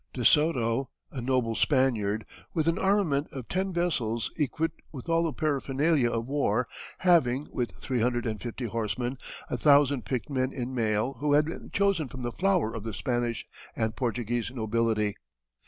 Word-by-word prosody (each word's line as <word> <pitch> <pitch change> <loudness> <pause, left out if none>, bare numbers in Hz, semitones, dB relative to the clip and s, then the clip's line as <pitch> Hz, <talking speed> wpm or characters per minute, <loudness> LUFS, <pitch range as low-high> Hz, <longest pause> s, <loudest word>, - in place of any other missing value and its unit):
De 125 -3 -2
Soto, 135 -5 +3 0.2
a 130 - -5
noble 125 -2 +1
Spaniard, 110 -3 +2 0.3
with 160 -1 +1
an 165 +3 +2
armament 190 -8 +2
of 130 -4 -7
ten 190 +1 -1
vessels 125 - -1
equipped 160 +2 -1
with 135 -1 -8
all 165 0 +3
the 165 -1 0
paraphernalia 145 -2 +1
of 115 0 -2
war, 125 -4 +1 0.3
having, 150 -7 +3
with 120 -2 -1
three 125 -3 -2
hundred 120 0 +1
and 110 -2 -3
fifty 120 +1 -4
horsemen, 115 +3 -2 0.3
a - - -2
thousand 140 -3 +5
picked 125 +5 -3
men 130 -1 0
in 130 -1 -4
mail 115 +2 0
who 145 +1 +1
had 150 +1 +5
been 165 - -6
chosen 195 -6 +2
from 130 +1 -8
the 120 - -2
flower 180 - +1
of 115 -3 -5
the 110 -3 -4
Spanish 120 -2 -1 0.3
and 110 0 -1
Portuguese 120 -2 -1
nobility. 110 -3 0
130 Hz, 170 wpm, -28 LUFS, 115-150 Hz, 0.3 s, thousand